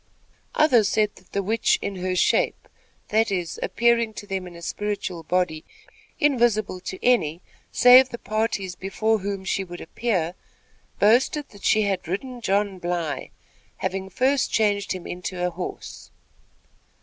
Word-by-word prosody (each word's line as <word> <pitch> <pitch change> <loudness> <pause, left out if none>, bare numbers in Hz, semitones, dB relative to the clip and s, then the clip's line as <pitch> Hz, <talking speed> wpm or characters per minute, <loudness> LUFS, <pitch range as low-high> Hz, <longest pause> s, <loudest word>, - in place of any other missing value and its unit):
Others 245 -10 +4
said 210 -1 +1
that - - -20
the 200 - -1
witch 220 +4 +2
"in 195 - -4
her 185 0 -2
shape," - - +1 0.4
that 220 +1 +2
is, 180 -4 -3
appearing 235 -2 +2
to - - -7
them 190 -2 -4
in 175 - -11
a 170 - -11
spiritual 205 -3 -3
body 170 -1 -1 0.6
invisible 235 -9 +2
to 185 +1 -6
any 175 -9 +2 0.3
save 250 +1 +7
the 235 - -6
parties 215 -4 -2
before 215 +4 0
whom 195 -1 -4
she 195 - 0
would 175 -1 -9
appear, 175 -3 -2 0.6
boasted 250 +7 +3
that 205 - -16
she 215 0 +4
had 195 -4 -2
ridden 245 +8 -4
John 200 -2 0
Bly, 175 -4 -3 0.5
having 190 +1 -3
first 265 +4 +1
changed 205 -2 +1
him 185 -2 -7
into 180 0 -4
a 180 - -1
horse. 180 +1 -7
200 Hz, 150 wpm, -24 LUFS, 180-225 Hz, 0.6 s, save